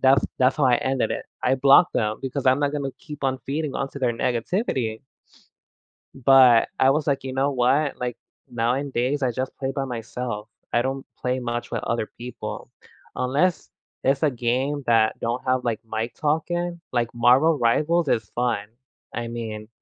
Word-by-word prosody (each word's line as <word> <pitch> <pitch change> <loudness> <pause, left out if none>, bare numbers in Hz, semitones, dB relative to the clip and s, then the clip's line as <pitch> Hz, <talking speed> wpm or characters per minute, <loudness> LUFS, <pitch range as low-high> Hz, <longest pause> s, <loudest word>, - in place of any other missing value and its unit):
that's 135 +1 +5
that's 130 +3 +3
how 145 - +2
I 125 -2 +5
ended 130 0 -1
it. - - -4 0.2
I 130 - +3
blocked 140 +6 +6
them 110 -1 0
because 135 +1 -4
I'm 130 +1 +5
not 145 -1 0
gonna 140 -2 -2
keep 150 -2 -9
on 130 -1 0
feeding 145 0 -2
onto 135 +1 -3
their 125 -3 +1
negativity. 120 - -1 1.3
But, 130 -4 +7
I 130 - +6
was 150 +2 +1
like, 140 -2 0
"You 130 - -4
know 135 +2 +1
what?" 135 +3 +2
Like, 125 -1 -3 0.4
nowadays, 130 +3 0
I 130 - +2
just 130 +2 -4
play 135 0 -2
by 135 0 -2
myself. 115 -2 -5 0.2
I 120 - +3
don't 135 +1 -3
play 125 +1 -1
much 120 -1 -4
with - - -3
other 115 -2 -1
people, 125 +1 -7 0.5
unless 145 +8 0 0.3
it's 135 +1 +2
a 155 - +4
game 130 +4 -1
that 115 -2 +3
don't 120 +2 -2
have 130 0 +1
like 115 -3 -1
mic 110 +1 -4
talking, 170 +3 -1
like 120 -2 +1
Marvel 130 +7 +4
Rivals 150 +7 +2
is 110 -6 0
fun, 120 -4 0 0.5
I 120 0 -3
mean, 110 -2 -6
130 Hz, 175 wpm, -24 LUFS, 120-140 Hz, 1.3 s, But